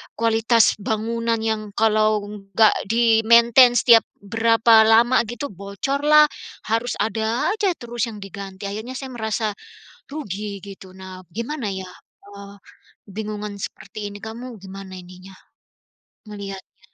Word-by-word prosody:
kualitas 230 Hz, 0 st, +3 dB
bangunan 230 Hz, +2 st, -2 dB
yang 215 Hz, -2 st, -2 dB
kalau 215 Hz, -1 st, +2 dB
enggak 205 Hz, +1 st, +1 dB, 0.2 s
di 225 Hz, 0 st, +3 dB
maintenance 235 Hz, +1 st, +6 dB
setiap 230 Hz, -2 st, +8 dB, 0.2 s
berapa 225 Hz, +1 st, +4 dB
lama 235 Hz, +3 st, +5 dB
gitu, 240 Hz, +5 st, -5 dB
bocor 200 Hz, +9 st, -4 dB
lah, 300 Hz, 0 st, +7 dB, 0.4 s
harus 230 Hz, +2 st, 0 dB
ada 220 Hz, -, -1 dB
aja 410 Hz, -4 st, 0 dB
terus 240 Hz, -1 st, -3 dB
yang 210 Hz, -, -9 dB
diganti, 195 Hz, 0 st, -8 dB
akhirnya 220 Hz, +5 st, -6 dB
saya 265 Hz, 0 st, -7 dB
ngerasa, 220 Hz, 0 st, -2 dB, 0.6 s
rugi 205 Hz, -8 st, -5 dB
gitu. 195 Hz, -2 st, -11 dB
Nah, 185 Hz, -1 st, -10 dB
gimana 235 Hz, -, -4 dB
ya, 190 Hz, -1 st, -6 dB, 0.5 s
eee, 200 Hz, 0 st, -11 dB, 0.5 s
kebingungan 210 Hz, 0 st, -6 dB
seperti 205 Hz, +1 st, -7 dB
ini 205 Hz, -, -10 dB
kamu 235 Hz, +2 st, -8 dB
gimana 190 Hz, 0 st, -10 dB
ininya, 185 Hz, +1 st, -14 dB, 1.0 s
ngelihatnya? 195 Hz, -2 st, -9 dB
220 Hz, 125 wpm, -22 LUFS, 200-235 Hz, 1.0 s, setiap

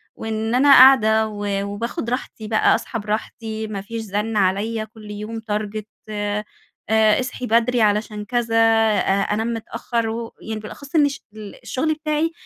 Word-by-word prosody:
وإن 220 Hz, +1 st, -2 dB
أنا 280 Hz, +3 st, +5 dB
قاعدة 220 Hz, -5 st, +7 dB
و 205 Hz, -2 st, -3 dB
وباخد 225 Hz, +3 st, -4 dB
راحتي 235 Hz, -3 st, -4 dB
بقى 215 Hz, 0 st, +3 dB
اصحى 230 Hz, -, -4 dB
براحتي، 220 Hz, +1 st, -4 dB
ما 205 Hz, -2 st, -5 dB
فيش 225 Hz, +3 st, -6 dB
زنّ 210 Hz, +1 st, -2 dB
عليَّ 210 Hz, +3 st, 0 dB
كل 215 Hz, -1 st, -12 dB
يوم 215 Hz, +2 st, -6 dB
target 210 Hz, 0 st, -2 dB, 0.3 s
آآ، 205 Hz, 0 st, -2 dB, 0.5 s
اصحي 220 Hz, +4 st, +2 dB
بدري 235 Hz, +2 st, +2 dB
علشان 210 Hz, 0 st, 0 dB
كذا 235 Hz, 0 st, -1 dB
أ 225 Hz, -1 st, +4 dB, 0.4 s
أنام 225 Hz, +2 st, -1 dB
متأخر 230 Hz, 0 st, -3 dB
و 230 Hz, +1 st, -5 dB
يعني 220 Hz, 0 st, -5 dB
بالأخص 280 Hz, +8 st, -10 dB
إن 295 Hz, -2 st, +5 dB
ش 280 Hz, -, -8 dB
ال 215 Hz, -2 st, -9 dB
الشغل 310 Hz, +5 st, -1 dB
بتاعي 305 Hz, +1 st, -1 dB
220 Hz, 155 wpm, -21 LUFS, 210-235 Hz, 0.5 s, قاعدة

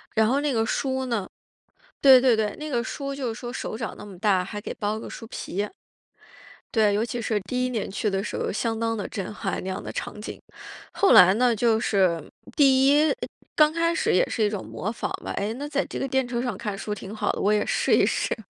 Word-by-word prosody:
然 220 Hz, 0 st, +4 dB
后 270 Hz, +4 st, +2 dB
那 290 Hz, -3 st, 0 dB
个 225 Hz, -1 st, +1 dB
书 260 Hz, +1 st, -1 dB
呢 215 Hz, -6 st, -2 dB, 0.7 s
对 265 Hz, -2 st, +8 dB
对 250 Hz, -3 st, +5 dB
对， 215 Hz, -1 st, -1 dB
那 305 Hz, 0 st, -6 dB
个 240 Hz, -3 st, 0 dB
书 275 Hz, +3 st, -4 dB
就 250 Hz, -5 st, -3 dB
是 -, -, -10 dB
说 240 Hz, -1 st, -6 dB
手 220 Hz, -, -4 dB
掌 225 Hz, -, -5 dB
那 -, -, -9 dB
么 195 Hz, -3 st, -11 dB
大， 190 Hz, -3 st, +2 dB
还 205 Hz, +2 st, -6 dB
给 -, -, -5 dB
包 210 Hz, 0 st, -2 dB
个 -, -, -8 dB
书 225 Hz, -, -9 dB
皮。 205 Hz, -2 st, -4 dB, 1.1 s
对， 215 Hz, -2 st, +4 dB
尤 210 Hz, +3 st, +1 dB
其 235 Hz, 0 st, -4 dB
是 220 Hz, -1 st, 0 dB
第 250 Hz, 0 st, 0 dB
1 -, -, 0 dB
年 230 Hz, -4 st, -3 dB
去 200 Hz, +2 st, -1 dB
的 195 Hz, 0 st, 0 dB
时 -, -, -5 dB
候 -, -, -2 dB
相 225 Hz, +1 st, -1 dB
当 225 Hz, 0 st, 0 dB
的 -, -, -3 dB
震 195 Hz, 0 st, -5 dB
撼， 195 Hz, -2 st, -3 dB
那 190 Hz, -, -5 dB
样 185 Hz, -, -4 dB
的 -, -, -7 dB
场 210 Hz, -, -5 dB
景。 -, -, -6 dB, 0.6 s
后 400 Hz, -, +4 dB
来 185 Hz, +1 st, +9 dB
呢， 245 Hz, 0 st, +3 dB
就 225 Hz, 0 st, +2 dB
是 185 Hz, -7 st, +2 dB, 0.4 s
第 270 Hz, -2 st, +5 dB
1， 300 Hz, -, +4 dB, 0.4 s
刚 305 Hz, 0 st, +5 dB
开 335 Hz, +1 st, +1 dB
始 -, -, +1 dB
也 180 Hz, -, +3 dB
是 225 Hz, -, -1 dB
一 205 Hz, -, +3 dB
种 205 Hz, -3 st, -5 dB
模 210 Hz, -, -4 dB
仿 235 Hz, -, -3 dB, 0.2 s
吧， -, -, -4 dB
哎， 205 Hz, +3 st, -1 dB
那 290 Hz, +3 st, -5 dB
在 285 Hz, -1 st, 0 dB
这 -, -, -6 dB
个 270 Hz, -, -1 dB
电 265 Hz, -1 st, +1 dB
车 240 Hz, 0 st, -2 dB
上 240 Hz, -7 st, -3 dB
看 210 Hz, -4 st, -4 dB
书 210 Hz, -, -5 dB
挺 205 Hz, 0 st, -6 dB
好 -, -, -1 dB
的， -, -, -2 dB
我 205 Hz, +2 st, +3 dB
也 210 Hz, -, +2 dB
试 -, -, +2 dB
一 -, -, +5 dB
试。 -, -, 0 dB
225 Hz, 260 characters per minute, -25 LUFS, 205-260 Hz, 1.1 s, 来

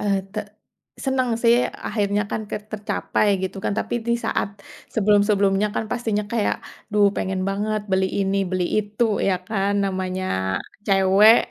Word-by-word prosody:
Eh, 200 Hz, -1 st, +1 dB, 0.2 s
te 215 Hz, -, -4 dB, 0.7 s
senang 265 Hz, -2 st, +1 dB
sih, 235 Hz, 0 st, +6 dB, 0.3 s
akhirnya 205 Hz, -1 st, 0 dB
kan -, -, -1 dB
ke -, -, -1 dB
tercapai, 215 Hz, 0 st, -1 dB, 0.2 s
gitu 190 Hz, +1 st, -3 dB
kan? -, -, +1 dB
Tapi -, -, -2 dB
di 235 Hz, -, +2 dB
saat -, -, 0 dB, 0.5 s
sebelum-sebelumnya 205 Hz, -1 st, +3 dB
kan, -, -, -1 dB
pastinya 225 Hz, -4 st, -1 dB
kayak, 225 Hz, -3 st, +1 dB, 0.4 s
duh 205 Hz, -1 st, +5 dB
pengen 190 Hz, 0 st, -1 dB
banget 210 Hz, +2 st, -1 dB
beli 190 Hz, 0 st, +3 dB
ini, 195 Hz, 0 st, +1 dB
beli 185 Hz, -1 st, 0 dB
itu, 210 Hz, +2 st, 0 dB, 0.2 s
ya 190 Hz, -, +3 dB
kan? 200 Hz, -1 st, 0 dB
Namanya 185 Hz, -1 st, -2 dB, 0.6 s
cewek 195 Hz, +3 st, +6 dB
205 Hz, 145 wpm, -23 LUFS, 195-215 Hz, 0.7 s, sih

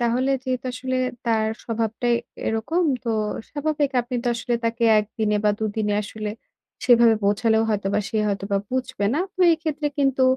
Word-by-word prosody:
তাহলে 245 Hz, +3 st, +1 dB
যেহেতু 255 Hz, -1 st, -2 dB
আসলে 255 Hz, +1 st, -3 dB, 0.3 s
তার 220 Hz, -1 st, +2 dB, 0.2 s
স্বভাবটাই 230 Hz, +1 st, 0 dB, 0.3 s
এরকম, 225 Hz, +11 st, 0 dB, 0.2 s
তো 230 Hz, -, 0 dB, 0.4 s
স্বাভাবিক 295 Hz, -1 st, 0 dB
আপনি 245 Hz, +1 st, -4 dB
তো -, -, +1 dB
আসলে 240 Hz, +1 st, -2 dB
তাকে 230 Hz, +1 st, 0 dB
১ 210 Hz, -, 0 dB
দিনে 210 Hz, -1 st, +2 dB
বা 210 Hz, -, +5 dB
২ 220 Hz, -, -2 dB
দিনে 210 Hz, -2 st, 0 dB
আসলে 210 Hz, 0 st, -5 dB, 0.5 s
সেভাবে 235 Hz, -2 st, +6 dB
বোঝালেও 220 Hz, +2 st, +3 dB
হয়তোবা 205 Hz, -1 st, 0 dB
সে 220 Hz, -, -3 dB
হয়তোবা 200 Hz, 0 st, -1 dB
বুঝবে 255 Hz, -5 st, -1 dB
না। 300 Hz, -, +1 dB, 0.2 s
তো 370 Hz, -, -6 dB
এক্ষেত্রে 315 Hz, -2 st, -2 dB
কিন্তু 270 Hz, -1 st, +2 dB
235 Hz, 160 wpm, -23 LUFS, 215-260 Hz, 0.5 s, সেভাবে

